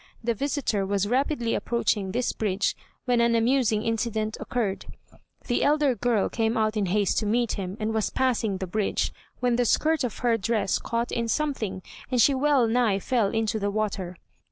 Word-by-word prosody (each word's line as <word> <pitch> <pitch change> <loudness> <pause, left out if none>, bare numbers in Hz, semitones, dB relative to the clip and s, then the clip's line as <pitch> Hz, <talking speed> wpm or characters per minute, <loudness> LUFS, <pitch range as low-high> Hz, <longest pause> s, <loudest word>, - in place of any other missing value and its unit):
The 235 +1 +1
visitor 270 -4 -1
was 200 0 0
rapidly 250 -1 0
approaching 210 -5 0
this 245 +3 -1
bridge 205 -2 0 0.3
when 245 -2 +2
an 235 0 +3
amusing 230 -2 +2
incident 220 -1 -1
occurred: 215 -6 -2 0.6
The 240 - 0
elder 295 -2 +3
girl 230 -2 +1
came 225 +1 -1
out 215 0 +1
in 205 -3 0
haste 200 +1 +1
to 215 - -2
meet 235 +1 +1
him, 190 0 -4
and 220 +1 -1
was 220 -1 0
passing 235 -6 0
the 190 - -4
bridge, 200 +3 -1 0.3
when 245 -1 +2
the 245 - +3
skirt 310 +6 +2
of 245 - -3
her 230 -1 +3
dress 220 -2 0
caught 235 +1 -2
in 235 -1 -1
something, 225 - -2 0.3
and 250 -1 0
she 275 +5 +5
well 270 -2 +3
nigh 225 -3 +2
fell 230 +1 +1
into 220 0 -1
the 205 0 -1
water. 200 -4 -3
225 Hz, 180 wpm, -26 LUFS, 210-245 Hz, 0.6 s, she